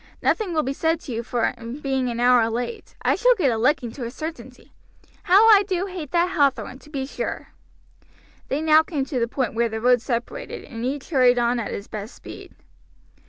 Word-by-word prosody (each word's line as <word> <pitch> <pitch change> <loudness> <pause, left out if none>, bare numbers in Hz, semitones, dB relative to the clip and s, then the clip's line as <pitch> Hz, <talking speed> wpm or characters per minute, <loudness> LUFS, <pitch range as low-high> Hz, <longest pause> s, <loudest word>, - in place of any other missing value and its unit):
Nothing 430 -5 +1
will 310 - +2
be 270 - -2
said 325 +3 0
to 270 - -8
you 230 0 -2
for 235 -1 -1 0.3
being 265 -3 -1
an 235 0 -4
hour 245 -2 +4
late. 245 - -5
I - - +3
shall - - +4
get 305 - +2
a 225 - -1
licking 250 -1 +1
to 260 - -7
a 235 - -3
certainty. 315 +6 -8 0.5
How 395 +5 +6
I 410 -2 +8
do 375 -2 -2
hate 360 -7 -7
that 350 +3 +1
Hathorn, 275 -3 0
to 300 - -17
be 275 -3 -3
sure!" 270 - -5 1.0
They 290 +3 -2
now 310 0 +6
came 305 -4 -3
to 265 -2 -3
the 235 - +1
point 255 +1 -2
where 235 +1 +1
the 220 0 -4
road 245 +1 +3
separated 235 -1 -4
and 230 -1 -8
each 270 +5 -4
hurried 250 -4 +4
on 240 0 +1
at 225 - -4
his 200 - -6
best 210 +2 -7
speed. - - -12
265 Hz, 210 wpm, -23 LUFS, 240-320 Hz, 1.0 s, I